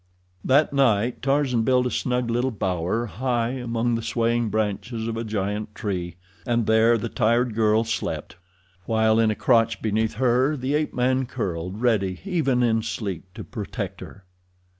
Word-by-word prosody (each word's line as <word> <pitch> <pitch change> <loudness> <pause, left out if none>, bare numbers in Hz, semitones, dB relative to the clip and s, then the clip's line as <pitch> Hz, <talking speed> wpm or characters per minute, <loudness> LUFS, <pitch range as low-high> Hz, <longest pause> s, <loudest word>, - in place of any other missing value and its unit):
That 140 +3 +3
night 120 -4 +2
Tarzan 135 -3 +1
built 125 +2 +2
a 125 - -1
snug 125 -1 -1
little 120 +3 +1
bower 95 0 -1
high 120 +1 -1
among 120 -2 -1
the 115 - -1
swaying 115 0 0
branches 110 +2 -2
of 115 - -3
a 115 - -3
giant 105 0 -3
tree, 90 -5 -3 0.3
and 120 -2 0
there 110 +2 +4
the 115 - -3
tired 120 +1 +1
girl 110 0 +3
slept, 115 -5 -4 0.5
while 110 0 +3
in 115 -1 +4
a 110 - 0
crotch 115 -1 +2
beneath 110 0 0
her 130 +4 +2
the 130 +2 -2
ape 150 0 -1
man 130 +1 +1
curled, 95 -4 -4
ready, 100 -6 +1
even 145 -10 +1
in 115 -2 +2
sleep, 100 -5 -4
to 110 - -7
protect 100 -3 -6
her. 100 - -11
115 Hz, 160 wpm, -24 LUFS, 110-125 Hz, 0.5 s, there